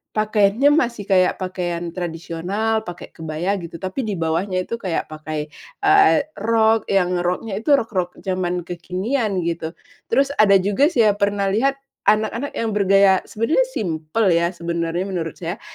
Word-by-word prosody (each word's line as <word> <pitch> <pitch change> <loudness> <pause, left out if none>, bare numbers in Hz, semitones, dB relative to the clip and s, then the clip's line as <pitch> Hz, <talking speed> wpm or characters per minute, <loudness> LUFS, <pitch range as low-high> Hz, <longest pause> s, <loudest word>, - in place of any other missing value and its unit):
pakaiannya 215 +4 +3
masih 235 -6 -2
kayak 185 -1 +4
pakaian 175 -2 -3
tradisional, 180 +6 -3
pakai 175 0 -8
kebaya 160 +5 -3
gitu, 170 -1 -9
tapi 220 +6 -3
di 205 - -2
bawahnya 180 +3 -1
itu 230 +5 -5
kayak 180 -6 -3
pakai, 155 -1 -5 0.3
eee, 395 -6 +5 0.2
rok 225 +1 +2
yang 180 -2 +1
roknya 185 +4 -2
itu 285 +6 +4
rok-rok 190 -8 -2
zaman 180 -2 -2
kekinian, 185 +4 -2
gitu. 165 -1 -3 0.3
Terus, 275 0 +2
ada 200 -2 +6
juga 200 +9 +3
saya 230 - +3
pernah 200 -1 +1
lihat 265 +7 +2 0.3
anak-anak 220 +6 0
yang 225 -1 -1
bergaya 195 -1 +4
sebenernya 230 - +1
simpel 175 - 0
ya, 170 +1 +2
sebenernya 170 0 -3
menurut 175 -5 -4
saya, 175 +1 -5
190 Hz, 145 wpm, -21 LUFS, 175-220 Hz, 0.3 s, ada